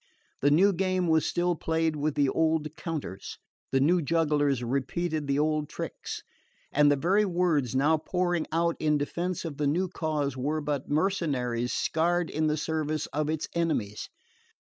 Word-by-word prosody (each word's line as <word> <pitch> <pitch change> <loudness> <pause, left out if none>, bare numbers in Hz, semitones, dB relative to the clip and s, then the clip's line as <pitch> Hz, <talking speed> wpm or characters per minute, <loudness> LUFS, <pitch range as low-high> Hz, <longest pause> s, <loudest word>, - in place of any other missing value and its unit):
The 145 - +4
new 190 +7 +5
game 185 0 0
was 160 -1 +3
still 175 0 +1
played 160 0 0
with 150 0 -1
the 145 -1 +3
old 160 -1 0
counters, 145 - -5 0.3
the 135 - +3
new 170 +6 +3
jugglers 145 -4 +1
repeated 150 +5 -2
the 140 0 +1
old 150 0 0
tricks; - - -6 0.5
and 145 0 +5
the - - +4
very 185 +9 +2
words 170 - +1
now 150 +4 +3
poured 175 0 -1
out 170 +1 +1
in 150 -1 +2
defence 175 +5 -3
of 150 -4 -5
the 150 - 0
new 175 +6 +1
cause 155 -5 -2
were 145 +4 -1
but 145 -2 -3
mercenaries 140 -8 0
scarred 170 +1 0
in 155 +1 0
the 150 0 +1
service 155 -1 -1
of 150 +1 0
its 155 -1 -2
enemies. 155 -12 -1
155 Hz, 165 wpm, -28 LUFS, 145-170 Hz, 0.5 s, new